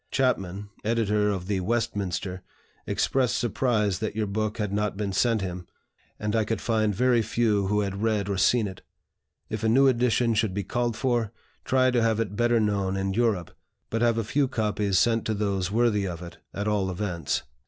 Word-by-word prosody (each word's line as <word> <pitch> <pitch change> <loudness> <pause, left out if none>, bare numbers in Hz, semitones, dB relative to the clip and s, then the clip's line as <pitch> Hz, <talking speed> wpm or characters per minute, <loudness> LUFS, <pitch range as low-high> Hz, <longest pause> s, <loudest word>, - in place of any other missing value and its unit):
Chapman, 100 -6 -1
editor 105 -2 +1
of 95 -3 -2
the 100 0 -1
'Westminster,' 100 -3 -2 0.5
expressed 130 -3 +1
surprise 110 -4 0
that 110 -2 -3
your 110 -1 0
book 110 +2 -2
had 105 -3 -2
not 105 -1 -1
been 100 -2 -2
sent 115 +2 +2
him, 90 -2 -5 0.5
and 105 +1 -1
I 110 - +3
could 110 +1 -2
find 110 -3 +1
very 125 +1 +3
few 110 -2 +1
who 105 +1 +1
had 100 0 -3
read 110 -3 +1
or 100 -1 -1
seen 115 0 +3
it. 95 -2 -9 0.7
If 110 0 -5
a 110 - +3
new 135 +4 +5
edition 120 -2 +2
should 110 -3 0
be 100 - -1
called 120 +3 -1
for, 120 -5 0 0.3
try 130 -1 +3
to 120 -1 +2
have 115 -1 +2
it 105 -3 -2
better 120 +1 +3
known 100 -3 0
in 95 0 -1
Europe, 105 -6 0 0.4
but 115 - -1
have 120 -1 +3
a 115 - 0
few 135 +6 +1
copies 105 -5 0
sent 115 +1 +3
to 110 - 0
those 100 -3 -1
worthy 105 -2 +2
of 90 -1 -6
it, 85 - -10
at 100 +1 -3
all 100 -3 +1
events." 90 -5 -2
105 Hz, 195 wpm, -26 LUFS, 100-115 Hz, 0.7 s, new